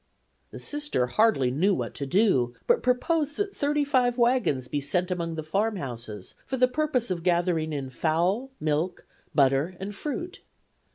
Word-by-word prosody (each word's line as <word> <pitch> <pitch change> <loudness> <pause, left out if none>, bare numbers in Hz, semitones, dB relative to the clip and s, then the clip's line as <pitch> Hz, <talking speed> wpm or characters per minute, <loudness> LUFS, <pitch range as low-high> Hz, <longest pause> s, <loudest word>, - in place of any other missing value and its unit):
The - - -9
Sister 295 - -1
hardly 135 - +2
knew 185 +9 +2
what - - -4
to 140 - -5
do, 135 - +2
but 480 0 +3
proposed 295 +4 +1
that 285 -10 +1
wagons 235 - +2
be 145 +2 -2
sent 180 +6 -1
among 170 -2 -2
the 155 - -4
farmhouses 145 - -3
for 265 - -3
the 255 0 +5
purpose 250 -5 0
of 175 -2 -2
gathering 170 -2 +1
in 135 -3 -4
fowl, 175 - 0
milk, 155 +4 -1 0.3
butter 140 +5 +3
and 195 +2 -5
fruit. 345 - -5
185 Hz, 150 wpm, -27 LUFS, -, 0.3 s, the